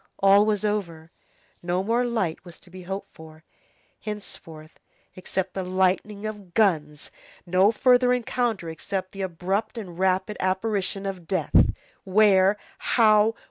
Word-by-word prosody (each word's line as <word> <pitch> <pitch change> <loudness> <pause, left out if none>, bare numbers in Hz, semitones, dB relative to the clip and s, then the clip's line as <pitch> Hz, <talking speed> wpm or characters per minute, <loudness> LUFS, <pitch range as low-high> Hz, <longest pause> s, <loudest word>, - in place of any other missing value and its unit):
All 200 +2 +5
was 215 -1 0
over. 170 -6 -3 0.5
No 175 +2 -1
more 230 +4 +1
light 220 -9 -2
was 175 -2 -13
to 180 - -19
be 185 0 -10
hoped 195 +2 -6
for, 160 0 -14 0.6
henceforth, 165 -7 -9 0.4
except 185 0 -4
the 190 - -3
lightning 190 +3 0
of 205 -5 -8
guns, 155 -9 +1 0.3
no 185 +4 +4
further 250 +2 +4
encounter 240 -6 -1
except 185 +4 -4
the 195 - -7
abrupt 190 +5 -2
and 180 -6 -8
rapid 190 +2 0
apparition 195 +1 -1
of 185 -4 -6
death. 185 -7 +3 0.3
Where? 195 0 +4 0.2
How? 215 -1 +3
190 Hz, 135 wpm, -25 LUFS, 180-210 Hz, 0.6 s, All